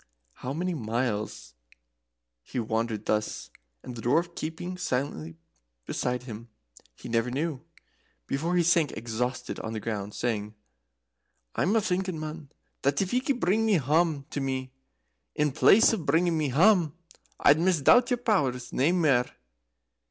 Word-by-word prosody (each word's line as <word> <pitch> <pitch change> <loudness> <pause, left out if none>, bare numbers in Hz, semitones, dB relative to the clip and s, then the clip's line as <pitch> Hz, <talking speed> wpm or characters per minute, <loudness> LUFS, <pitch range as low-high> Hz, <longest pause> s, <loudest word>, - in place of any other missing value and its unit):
How 125 - -6
many 175 +5 -2
miles 115 - -3 0.9
he 65 - -5
wandered 110 -1 -2
thus, 105 0 -2 0.3
the 120 -2 -7
Dwarf 165 +9 +1
keeping 165 +3 -5
silently 125 - -3 0.5
beside 125 0 -2
him, 115 -1 -9 0.5
he - - -10
never 115 +1 0
knew, 145 +2 -2 0.6
before 165 - -1
he 175 - +4
sank 170 -3 +3
exhausted 120 +3 -3
on 110 - -5
the 110 - -3
ground, 105 -2 -4
saying: 110 -3 -2 1.0
"I'm 210 +5 +2
thinking, 185 -3 -1
man, 155 -1 -7 0.3
that 140 +1 +1
if 190 +2 -1
ye 250 - +3
could 265 -1 -1
bring 220 +4 +2
hame 160 - +2
to 140 - -3
me, 130 -1 -3 0.6
in 150 -1 +1
place 200 - +6
of 175 -9 -3
bringing 165 +4 +3
me 155 -3 0
hame, 170 - +4 0.5
I'd 145 +2 +5
misdoubt 185 - +4
your 245 - +2
powers 140 - 0
nae 140 +6 +3
mair. 145 -9 +3
140 Hz, 135 wpm, -27 LUFS, 120-175 Hz, 1.0 s, place